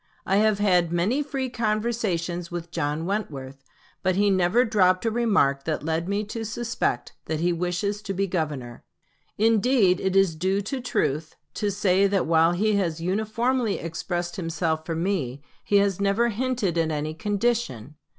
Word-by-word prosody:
I 195 - +2
have 215 0 +3
had 180 -5 +2
many 190 +11 +1
free 275 -2 -3
conversations 215 -7 -1
with 170 -1 -6
John 150 0 -2
Wentworth; 140 -9 -4 0.4
but 185 0 +1
he 205 +1 +3
never 185 +6 +3
dropped 185 -3 +3
a 225 - +2
remark 195 -13 +2
that 155 -1 -2
led 165 +2 -1
me 200 +1 0
to 225 +2 -5
suspect 230 +2 -2
that 160 -1 -2
he 175 +2 +1
wishes 180 +4 -2
to 200 -2 -4
be 195 +2 +1
Governor. 150 -10 -4 0.5
Indeed 220 -3 +3
it 190 0 -1
is 195 -3 +4
due 190 +5 0
to 255 +6 -4
truth 155 - -1 0.2
to 210 - -1
say 200 -1 +3
that 195 -1 +1
while 165 +1 +4
he 210 +3 +1
has 170 -5 -1
uniformly 220 +5 0
expressed 175 +1 -4
himself 165 -2 -2
for 165 - -2
me, 160 -7 -2 0.2
he 205 - 0
has 200 -1 +2
never 200 +4 +2
hinted 225 -6 -1
at 165 -1 +1
any 155 0 -2
condition. 205 - -1
190 Hz, 165 wpm, -25 LUFS, 165-215 Hz, 0.5 s, is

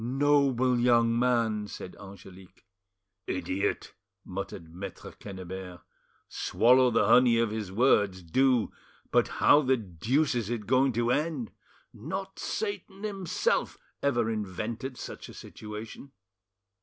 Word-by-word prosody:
"Noble 130 -1 +2
young 120 -1 +3
man!" 115 -4 +1
said 95 - -8
Angelique. 95 -1 -14 0.6
"Idiot!" 95 +1 -2 0.3
muttered 90 -3 -7
Maitre 95 +3 -8
Quennebert; 95 -2 -8 0.5
"swallow 125 +2 +3
the 115 - +2
honey 125 -2 +5
of 115 -2 +1
his 105 -4 -4
words, 100 -5 +2
do 125 +6 +2 0.4
But - - +3
how 145 - +4
the 130 -2 +2
deuce 115 - 0
is 115 -4 -2
it 115 -3 -3
going 130 +3 +3
to 120 +1 +1
end? 160 - -1 0.4
Not - - -6
Satan 215 - -4
himself 195 -5 -1 0.2
ever 120 -5 +1
invented 110 +5 -4
such - - -8
a - - -11
situation." 110 +5 -9
115 Hz, 120 wpm, -28 LUFS, 100-130 Hz, 0.6 s, honey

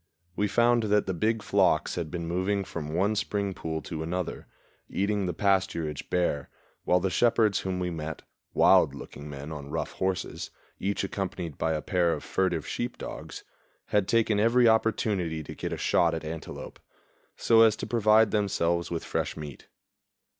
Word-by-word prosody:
We 105 - +1
found 120 +3 +3
that 105 0 +2
the 95 - -2
big 110 +5 0
flocks 95 -6 +2
had 85 -3 -3
been 85 0 -4
moving 95 +4 0
from 75 -5 -6
one 100 +5 +2
spring 100 -1 -1
pool 80 -3 -4
to 80 +1 -5
another, 90 +2 -3 0.4
eating 100 0 0
the - - 0
pasturage 95 -7 0
bare, 85 -6 0 0.4
while 90 - +4
the 95 +1 -1
shepherds 110 -3 +3
whom 95 -1 -3
we 90 -1 -1
met 80 -1 -5 0.3
wild - - +5
looking 75 +1 -9
men 70 +2 -7
on 70 -2 -7
rough - - -3
horses, 95 -3 -3 0.3
each 100 +1 -1
accompanied 90 -5 -4
by 80 - +1
a 75 - -2
pair 90 -4 +2
of - - -5
furtive 90 -5 0
sheep 120 +1 -3
dogs - - -7 0.5
had 105 -3 +2
taken 115 -2 +2
every 115 +3 +4
opportunity 105 -7 +1
to - - -8
get - - -5
a - - -3
shot 85 -1 +2
at 80 - -5
antelope, 80 +1 -7 0.6
so 115 -1 +5
as 110 -2 +6
to - - -5
provide 110 -1 +4
themselves 85 -5 0
with 85 -1 -3
fresh - - -2
meat. 75 -4 -8
95 Hz, 170 wpm, -28 LUFS, 80-105 Hz, 0.6 s, as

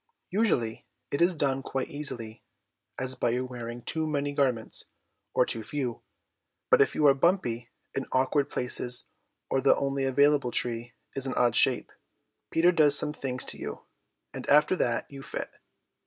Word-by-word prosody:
Usually 170 - 0 0.2
it 140 - -1
is 175 +1 +4
done 135 -3 0
quite 135 -1 -3
easily, 120 -7 -5 0.6
as 130 0 -1
by 120 - 0
your 125 +2 -1
wearing 120 -1 -7
too 160 -1 -2
many 145 -1 -1
garments 130 -6 0 0.5
or - - +4
too 115 - -3
few, 125 +1 -4 0.7
but - - +7
if - - +2
you 150 - +2
are 140 - +8
bumpy 135 -7 0 0.2
in - - -3
awkward 135 +2 +1
places 125 0 +1 0.5
or 135 - +2
the 135 - +5
only 135 -1 -1
available 140 0 +3
tree 120 -1 -2 0.2
is 135 0 +1
an 130 - -3
odd 120 -1 +3
shape, 130 -2 +3 0.6
Peter 170 +2 +4
does 150 -4 +5
some 150 - 0
things 130 -3 -3
to - - -4
you, - - -6 0.5
and - - -6
after 150 +5 +5
that 120 -9 0
you 140 -1 -10
fit. - - -6
135 Hz, 165 wpm, -28 LUFS, 120-145 Hz, 0.7 s, are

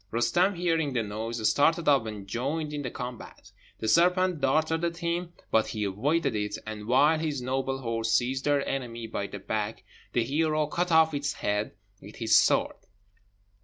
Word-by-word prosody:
Roostem, 175 - +2
hearing 165 -5 0
the 120 -3 0
noise, 110 +2 -2
started 165 +3 +2
up 135 -6 +4
and 105 -3 -7
joined 145 +8 -3
in 145 - -3
the 130 - -3
combat. 125 -1 -8 0.3
The 110 - -4
serpent 180 - +3
darted 155 +4 +1
at 170 0 -1
him, 170 +1 -2 0.2
but 110 -1 +3
he 110 -5 -3
avoided 135 - 0
it, 105 -1 -2
and, 110 -1 -7
while 145 +6 +4
his 155 -3 -2
noble 135 +1 -2
horse 115 -1 -1
seized 130 +3 +1
their 145 -1 +1
enemy 120 -4 -4
by 100 -2 -4
the 100 - -7
back, 105 -1 -3 0.3
the 120 - +2
hero 155 +4 +1
cut 175 +4 -2
off 160 -1 +5
its 140 0 -1
head 105 +1 -2 0.3
with 105 +2 -12
his 115 -2 +2
sword. - - +3
135 Hz, 175 wpm, -28 LUFS, 115-160 Hz, 0.3 s, off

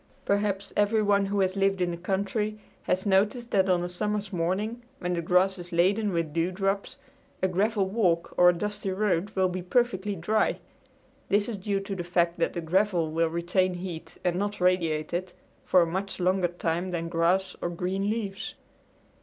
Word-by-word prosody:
Perhaps 200 -1 0
everyone 205 -1 +3
who 200 0 0
has 190 0 +1
lived 195 -1 +2
in 180 -1 +1
the - - -3
country 200 +4 -2 0.2
has 185 +2 -1
noticed 210 +5 +2
that 190 -1 +3
on 175 -1 +3
a - - -2
summer's 205 +2 -2
morning 190 +7 -1 0.2
when 180 0 -2
the 170 - -1
grass 180 +3 +2
is 175 0 -9
laden 195 +5 +2
with 165 -4 -1
dewdrops 195 +4 -1 0.5
a - - +5
gravel 200 +2 +1
walk 185 -5 +1
or 180 0 +7
a - - +4
dusty 205 +2 -3
road 190 -1 0
will 190 -1 +3
be 180 0 -3
perfectly 205 0 0
dry. 210 +6 +1 0.7
This 205 +1 +2
is 235 - -3
due 195 +1 -1
to 195 0 -5
the 175 - -4
fact 170 0 +1
that - - +1
the 170 - -3
gravel 175 -1 +1
will 165 +1 +1
retain 180 +2 0
heat 175 -2 -7
and 180 -1 +1
not 205 +2 -2
radiate 170 -4 +1
it, 180 +1 -3 0.3
for 180 -2 +5
a - - +1
much 190 +4 -3
longer 185 0 +2
time 175 +1 -2
than 170 -2 -3
grass 175 +3 +1
or 175 - -1
green 185 +3 -2
leaves. 205 -3 -3
185 Hz, 185 wpm, -27 LUFS, 175-200 Hz, 0.7 s, or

